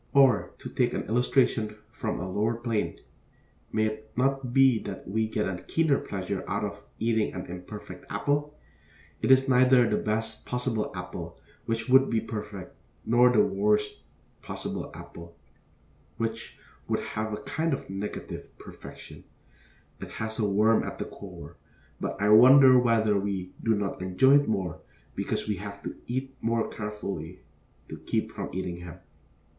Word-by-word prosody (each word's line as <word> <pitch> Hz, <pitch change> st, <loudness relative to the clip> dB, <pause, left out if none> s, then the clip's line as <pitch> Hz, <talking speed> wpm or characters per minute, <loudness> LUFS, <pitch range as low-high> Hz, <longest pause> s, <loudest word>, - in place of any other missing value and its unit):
Or, 135 Hz, -6 st, +4 dB
to -, -, -8 dB
take -, -, 0 dB
an -, -, -2 dB
illustration 115 Hz, -2 st, +1 dB
from -, -, -3 dB
a 90 Hz, -, -4 dB
lower 105 Hz, +5 st, 0 dB
plane, 115 Hz, -7 st, -2 dB, 0.7 s
may 110 Hz, 0 st, +2 dB
it 110 Hz, 0 st, -5 dB
not 135 Hz, -1 st, +1 dB
be 135 Hz, -3 st, +5 dB
that 95 Hz, -2 st, -7 dB
we 110 Hz, +3 st, 0 dB
get 110 Hz, -1 st, -1 dB
a 90 Hz, -2 st, -4 dB
keener 160 Hz, -4 st, +2 dB
pleasure 95 Hz, -1 st, -4 dB
out 100 Hz, +1 st, -1 dB
of 100 Hz, 0 st, -6 dB
eating 110 Hz, -2 st, 0 dB
an 90 Hz, -, -5 dB
imperfect 90 Hz, +4 st, -9 dB
apple? 145 Hz, +1 st, -1 dB, 0.6 s
It -, -, 0 dB
is 130 Hz, +1 st, +6 dB
neither 125 Hz, -1 st, +5 dB
the 105 Hz, -, +1 dB
best 110 Hz, +1 st, -2 dB
possible 125 Hz, -3 st, -2 dB
apple, 90 Hz, -2 st, -7 dB, 0.3 s
which 115 Hz, 0 st, -1 dB
would 130 Hz, +1 st, +6 dB
be 115 Hz, -, +2 dB
perfect, 105 Hz, -3 st, -7 dB, 0.3 s
nor 120 Hz, +2 st, +5 dB
the 110 Hz, -4 st, +5 dB
worst 105 Hz, +1 st, +1 dB, 0.4 s
possible -, -, -5 dB
apple, 85 Hz, 0 st, -11 dB, 0.8 s
which 115 Hz, 0 st, -4 dB, 0.3 s
would -, -, 0 dB
have 110 Hz, 0 st, -2 dB
a 105 Hz, -, -2 dB
kind 160 Hz, +1 st, -1 dB
of 135 Hz, -, -3 dB
negative 95 Hz, +2 st, -6 dB
perfection; -, -, -11 dB, 0.8 s
it -, -, -8 dB
has 110 Hz, 0 st, -4 dB
a 105 Hz, -2 st, +2 dB
worm 110 Hz, +3 st, +4 dB
at -, -, -5 dB
the -, -, -3 dB
core; -, -, -10 dB, 0.4 s
but -, -, -4 dB
I 105 Hz, +1 st, +2 dB
wonder 130 Hz, +4 st, +9 dB
whether 110 Hz, -4 st, +3 dB
we 95 Hz, -2 st, -3 dB
do 115 Hz, -1 st, +2 dB
not 100 Hz, -2 st, -3 dB
enjoy 130 Hz, +10 st, +5 dB
it 145 Hz, -, -3 dB
more 95 Hz, -6 st, -2 dB, 0.3 s
because -, -, -2 dB
we 105 Hz, -2 st, -1 dB
have 100 Hz, +1 st, -8 dB
to -, -, -5 dB
eat 130 Hz, +2 st, -4 dB
the -, -, -3 dB
more 115 Hz, 0 st, +1 dB
carefully 100 Hz, -5 st, -6 dB, 0.5 s
to -, -, -8 dB
keep -, -, -2 dB
from -, -, -5 dB
eating 90 Hz, -2 st, -4 dB
him. 85 Hz, -2 st, -9 dB
110 Hz, 160 wpm, -28 LUFS, 100-125 Hz, 0.8 s, wonder